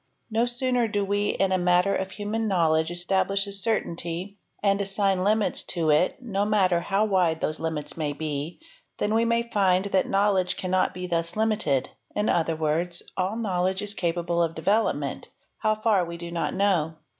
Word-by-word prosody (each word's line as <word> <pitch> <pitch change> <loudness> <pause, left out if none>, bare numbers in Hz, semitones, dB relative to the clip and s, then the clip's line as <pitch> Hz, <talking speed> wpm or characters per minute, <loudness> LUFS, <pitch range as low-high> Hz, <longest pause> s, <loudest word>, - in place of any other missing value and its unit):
No 230 +2 +2
sooner 245 -1 +1
do 205 -2 -1
we 205 +1 0
in 195 -1 +1
a 185 - +2
matter 180 +2 +3
of 190 - -2
human 215 +3 -3
knowledge 160 -4 +2
establish 190 +3 +1
a 200 - -6
certainty 190 -2 -3 0.2
and 200 0 +2
assign 195 -1 0
limits 210 +1 +2
to 165 -3 0
it, 155 - +2
no 205 -6 -2
matter 195 -4 +2
how 195 +4 +1
wide 180 -6 +2
thos 155 0 -2
limits 160 -2 -4
may 155 -3 -2
be, 150 +1 -4 0.4
than 210 - 0
we 230 +1 +2
find 195 -5 +2
that 195 -2 +1
knowledge 195 -2 +2
cannot 185 0 0
be 180 0 -4
thus 170 -1 -2
limited; 210 - +1 0.2
i - - +1
other 165 -5 +1
words, 165 +3 -1
all 190 +3 -1
knowledge 190 -3 0
is 205 0 -2
capable 170 -2 -1
of 165 -1 0
development—how 215 +3 -1
far 215 -2 +2
w 170 -1 -3
do 170 0 -7
not 170 +2 -2
know. 180 -5 +1
190 Hz, 170 wpm, -26 LUFS, 170-205 Hz, 0.4 s, matter